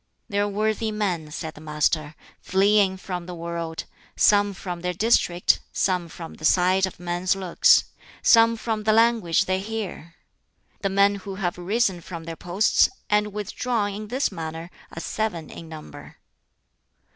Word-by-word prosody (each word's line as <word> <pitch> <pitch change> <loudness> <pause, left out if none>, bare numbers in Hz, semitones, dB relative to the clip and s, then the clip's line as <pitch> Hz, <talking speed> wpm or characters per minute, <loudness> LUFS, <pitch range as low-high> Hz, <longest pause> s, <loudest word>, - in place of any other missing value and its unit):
"There 200 0 0
are 205 - +1
worthy 215 +2 -1
men," 185 -7 -2
said 160 +1 -6
the 150 - -13
Master, 150 0 -1 0.2
"fleeing 195 0 +3
from 180 -2 -6
the 180 - -6
world; 170 -1 -4 0.3
some 205 -1 +4
from 180 -2 -6
their 180 0 -2
district; 180 -4 +3
some 180 -3 0
from 165 0 -9
the - - -14
sight 185 +3 +3
of 185 - -11
men's 175 +2 0
looks; 185 -3 +4 0.4
some 230 0 +6
from 220 -1 -2
the 215 +1 +2
language 225 -7 +3
they 185 0 0
hear." 195 -5 -6 0.7
"The 195 - 0
men 200 +1 +3
who 195 0 -7
have 180 -3 -2
risen 190 -1 0
from 170 -1 -8
their 165 0 -6
posts 180 +6 +2 0.2
and 210 0 +2
withdrawn 210 +1 -2
in 210 +1 -6
this 255 +3 0
manner 165 -1 -6 0.2
are - - -7
seven 175 -8 -3
in 165 - -10
number." 155 -1 -11
190 Hz, 155 wpm, -24 LUFS, 170-210 Hz, 0.7 s, some